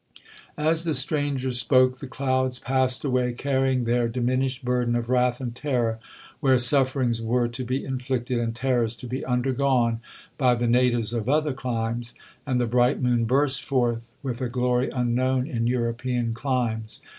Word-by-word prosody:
'As 160 +2 +2
the 160 -3 0
stranger 135 -1 0
spoke, 130 +2 +3
the 140 - -7
clouds 130 -1 -1
passed 130 +1 0
away, 125 -2 +1
carrying 130 -1 0
their 120 0 +1
diminished 130 +2 -1
burden 125 -1 +1
of 120 0 -2
wrath 125 -1 +2
and 125 -3 -4
terror 120 -4 -1 0.4
where 130 -2 +4
sufferings 125 -1 +2
were 120 +2 +1
to 125 +2 -5
be 130 +2 -2
inflicted, 125 -2 -2
and 115 -1 -2
terrors 120 -2 0
to 120 - -10
be 125 +2 -4
undergone, 125 -2 +1 0.4
by 125 -3 +4
the 120 0 -1
natives 120 -2 +2
of 115 0 -2
other 150 0 +2
climes—and 120 +1 -4
the 120 - +1
bright 120 +3 +2
moon 120 -2 +1
burst 135 +3 +2
forth 120 -4 -1
with 130 -2 -4
a 125 - -1
glory 125 +1 0
unknown 125 +1 0
in 120 -6 -2
European 120 0 -1
climes. 115 -4 -2
125 Hz, 155 wpm, -25 LUFS, 120-130 Hz, 0.4 s, where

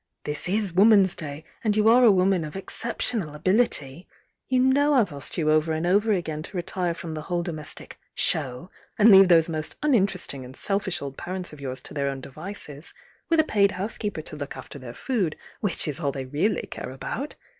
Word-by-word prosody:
This 150 +3 -4
is 200 -2 0
Woman's 195 -1 +6
Duy, 150 -1 -7 0.2
and 215 -2 +1
you 215 0 +4
are 240 +3 +6
a 230 - +8
woman 185 -2 +2
of 150 +2 -7
exceptional 195 -4 0
ability. 180 - 0 0.4
You 255 - +1
know 285 +3 +4
I've 225 - +2
asked 140 -1 -5
you 155 -2 +2
over 155 +1 +2
and 160 +2 -2
over 205 +5 +3
again 160 -6 -1
to 185 +4 -8
retire 175 0 -2
from 165 -2 -6
the 155 - -5
whole 175 +2 -2
domestic 155 -4 -6 0.2
'show,' 130 +8 -2 0.3
and 220 0 +7
leave 195 -1 +9
those 165 -2 +5
most 155 -2 -3
uninteresting 195 - +1
and 125 +1 -11
selfish 195 -3 -1
old 140 -1 -7
parents 180 -1 -5
of 150 - -11
yours 130 -1 -5
to - - -11
their 140 -1 -1
own 135 -1 -4
devices, 155 +1 -7 0.3
with 330 -1 +3
a - - +6
paid 200 -8 +2
housekeeper 205 -3 -2
to 155 - -8
look 145 -2 -6
after 130 +2 -9
their 130 -2 -9
f 120 - -11
od, 200 - 0 0.2
which 200 -5 -2
is 150 +1 -2
all 145 -4 0
they 135 -1 -5
really 160 +9 0
care - - -7
about. 230 - -5
175 Hz, 205 wpm, -25 LUFS, 150-205 Hz, 0.4 s, leave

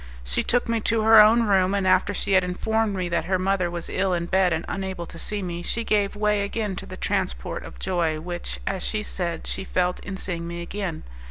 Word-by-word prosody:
She 60 +1 0
took 245 0 +1
me 230 0 +1
to 225 +1 +1
her 220 0 +9
own 225 +2 +6
room, 195 -2 +3
and 195 -1 0
after 185 +2 +3
she 200 0 -2
had 190 -1 +5
informed 210 +4 0
me 185 -1 -1
that 170 - 0
her 185 +1 +1
mother 185 -1 +1
was 170 -1 -5
ill 185 -1 0
in 170 0 -2
bed 190 0 +2
and 160 +1 -1
unable 190 -3 -4
to 165 - -10
see 210 -2 -3
me, 175 -1 -4
she 230 +6 -2
gave 205 -2 +1
way 210 0 +1
again 205 0 -2
to - - -7
the - - -8
transport - - -2
of - - -10
joy 170 -4 0
which, 175 +2 -5
as 190 -2 -2
she 215 -1 -2
said, 170 -5 -4
she - - -3
felt 180 -1 0
in 195 -1 -6
seeing 170 -3 -4
me 170 0 -5
again. 185 -3 -4
190 Hz, 235 wpm, -24 LUFS, 175-205 Hz, -, her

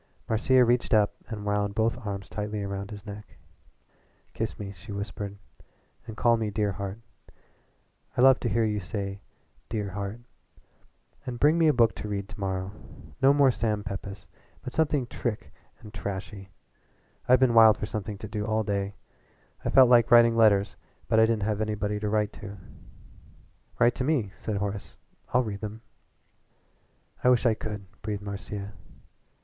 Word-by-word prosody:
Marcia 125 +3 +4
reached 120 -1 +2
up 105 -1 +3
and 105 -3 -6
wound 105 -1 0
both 115 +1 +2
arms 100 -2 -4
tightly 105 0 -4
round 100 0 -5
his 105 -1 -9
neck. 105 0 -10 1.0
"Kiss - - -3
me," 100 -1 -6
she 100 +3 -12
whispered, 100 0 -5 0.7
"and 110 -1 -8
call 120 -1 +4
me 110 -1 -2
'dear 105 0 0
heart.' 100 +3 -6 1.2
I - - +3
love 130 0 +7
to 120 - -1
hear 115 0 +2
you 105 -1 0
say 100 +1 -5 0.5
'dear 105 -3 -3
heart.' 100 +4 -5 1.1
And 120 -1 -4
bring 150 +2 +5
me 165 - +5
a - - +6
book 115 -4 +3
to - - -5
read 100 -1 -4
to - - -10
morrow. 95 -1 -2 0.5
No 135 +1 +7
more 140 -2 +5
Sam 110 -3 -1
Pepys, 100 -1 -6 0.4
but 125 - -6
something 145 -4 +1
trick 120 -2 -4 0.3
and 110 -2 -12
trashy. 100 +1 -6 0.8
I've 125 0 +7
been 130 -2 +4
wild 110 -2 +7
for - - -3
something 105 -1 -5
to 110 - -7
do 105 0 -3
all 110 +1 0
day. 100 -1 -2 0.7
I - - -1
felt 130 -1 +7
like 120 -2 +5
writing 115 -1 +7
letters, 105 -3 +4 0.3
but 110 - +4
I 110 - +6
didn't 110 -3 0
have 105 0 -1
anybody 105 -1 -1
to 105 0 -2
write 105 0 0
to." 100 -1 -8 1.2
"Write 120 0 +4
to 130 - -3
me," 130 -9 0
said 105 -2 -4
Horace. 100 0 -4 0.3
"I'll 125 +1 +3
read 100 -3 -5
them." 110 +1 -6 1.4
"I 125 - +5
wish 125 0 +3
I 115 - +5
could," 105 -2 -6 0.2
breathed 105 0 -4
Marcia. 100 0 -6
105 Hz, 165 wpm, -27 LUFS, 100-115 Hz, 1.4 s, love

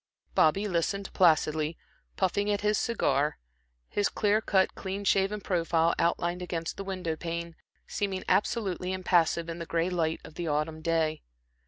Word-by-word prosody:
Bobby 195 +7 +3
listened 195 +2 -1
placidly, 155 -2 +3 0.4
puffing 200 +2 +1
at 205 -1 +1
his 210 0 +2
cigar, 150 - +1 0.5
his 205 - 0
clear 210 0 +2
cut, 190 -3 +2
clean 195 +1 -5
shaven 195 +1 +2
profile, 170 -3 +1
outlined 175 +1 0
against 165 -2 -3
the 195 - -5
window 185 -4 -3
pane 170 0 -5 0.3
seeming 195 -2 -2
absolutely 190 -4 0
impassive 170 -3 +2
in 165 0 -5
the 170 - -6
gray 170 +2 0
light 165 -2 0
of - - -11
the 170 +1 -4
autumn 155 +1 -1
day. 160 -1 0
175 Hz, 150 wpm, -29 LUFS, 165-195 Hz, 0.5 s, Bobby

